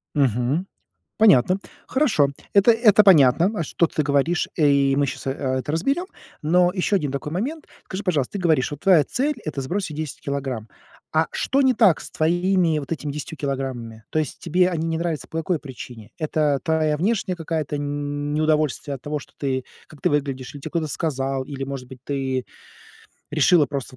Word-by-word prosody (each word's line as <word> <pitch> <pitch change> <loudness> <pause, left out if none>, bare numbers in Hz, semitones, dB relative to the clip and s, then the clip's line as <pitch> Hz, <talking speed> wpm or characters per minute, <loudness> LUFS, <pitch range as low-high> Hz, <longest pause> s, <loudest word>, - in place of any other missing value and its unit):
Мгм. 135 - +1 0.5
Понятно. 190 - +5 0.3
Хорошо, 240 - +2 0.2
это 200 +4 +6
это 215 -2 +5
понятно, 170 0 +6
а, 165 - -1
что 170 - +1
ты 160 - -1
говоришь, 145 +4 +1
э, 155 -3 +4
и 140 -1 +3
мы 140 0 +2
щас, 135 - -6
а, - - +1 0.3
это 130 +4 -4
разберем. 275 - 0 0.4
Но 175 +3 +3
еще 200 +1 +1
один 150 -8 0
такой 145 +2 -4
момент. 275 - -3 0.2
Скажи, 195 +2 -5
пожалуйста, 155 -9 0
ты 200 - -3
говоришь, 160 -7 +2
вот 145 - -6
твоя 175 -4 +5
цель- 285 - -1
это 150 -3 -3
сбросить 170 +3 -3
10 155 -3 -5
килограмм. 135 -6 -4 0.5
А 160 +1 +3
что 275 +2 +1
не 260 -1 +4
так 200 -9 +4
с - - -9
твоими 175 0 +2
вот 140 - -9
этими 150 -2 -3
10 150 +1 -6
килограммами? 130 -5 -4
То - - -3
есть 155 -1 -2
тебе 180 +1 +2
они 165 -2 -2
не 165 - -1
нравятся 165 -2 -3
по 160 - -6
какой 165 0 0
причине? 120 -5 -10
Это 150 -3 +1
твоя 155 -2 +1
внешняя 190 +1 0
какая-то 160 -3 -3
неудовольствие 145 0 -1
от 130 - -11
того, 150 0 -3
что - - -15
ты 130 -2 -1 0.2
как 150 - -16
ты - - +2
выглядишь, 140 -2 -2
или 140 - -9
те - - -6
кто-то 165 -2 -1
сказал, 135 -4 -2
или, 135 -1 -6
может 135 -2 -6
быть, 130 -1 -12
ты 135 -2 -2 0.9
решила 155 +1 +4
просто 135 -3 -5
150 Hz, 185 wpm, -23 LUFS, 140-175 Hz, 0.9 s, это